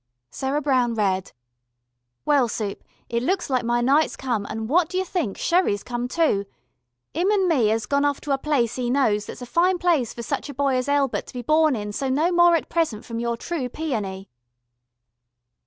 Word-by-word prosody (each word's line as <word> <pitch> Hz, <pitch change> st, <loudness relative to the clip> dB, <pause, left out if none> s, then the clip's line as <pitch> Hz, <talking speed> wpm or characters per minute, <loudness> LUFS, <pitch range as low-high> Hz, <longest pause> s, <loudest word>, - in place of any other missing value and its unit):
Sarah 275 Hz, +3 st, -2 dB
Brown 255 Hz, -4 st, +2 dB
read: 190 Hz, -3 st, 0 dB, 0.9 s
"Well 285 Hz, -4 st, +3 dB
Soup 210 Hz, -3 st, -4 dB, 0.2 s
it 235 Hz, 0 st, -1 dB
looks 355 Hz, +3 st, -1 dB
like 255 Hz, -2 st, +1 dB
my 240 Hz, +1 st, +1 dB
Night's 280 Hz, +6 st, +3 dB
come 235 Hz, -6 st, -2 dB
and 220 Hz, 0 st, -4 dB
what 330 Hz, +5 st, +2 dB
dyou 370 Hz, +1 st, -1 dB
think 335 Hz, -, -2 dB
Sherry's 340 Hz, -, +1 dB
come 245 Hz, 0 st, -3 dB
too. 250 Hz, -9 st, +1 dB, 0.7 s
Im 350 Hz, +5 st, +1 dB
an 400 Hz, -3 st, +2 dB
me 260 Hz, -11 st, +3 dB
as 220 Hz, 0 st, 0 dB
gone 280 Hz, 0 st, +1 dB
off 285 Hz, -1 st, +1 dB
to 290 Hz, -, -4 dB
a 270 Hz, -, +1 dB
place 255 Hz, -5 st, 0 dB
e 245 Hz, -1 st, -1 dB
knows 225 Hz, -6 st, +1 dB
that's -, -, -8 dB
a -, -, -5 dB
fine 355 Hz, +8 st, +2 dB
place 335 Hz, -10 st, +1 dB
for 235 Hz, -, -7 dB
such 230 Hz, -, -3 dB
a 285 Hz, -, -7 dB
boy 275 Hz, -1 st, +1 dB
as 255 Hz, +2 st, -1 dB
Elbert 280 Hz, -2 st, +1 dB
to -, -, -12 dB
be 245 Hz, -, -4 dB
born 310 Hz, +1 st, +3 dB
in 210 Hz, -2 st, -4 dB
so 265 Hz, +6 st, -2 dB
no 305 Hz, +7 st, +2 dB
more 345 Hz, -1 st, +5 dB
at 330 Hz, -, -1 dB
present 315 Hz, -11 st, -1 dB
from 230 Hz, -1 st, -5 dB
your 235 Hz, 0 st, -1 dB
true 275 Hz, -1 st, -3 dB
Peony." 210 Hz, -11 st, -4 dB
265 Hz, 200 wpm, -23 LUFS, 230-315 Hz, 0.9 s, more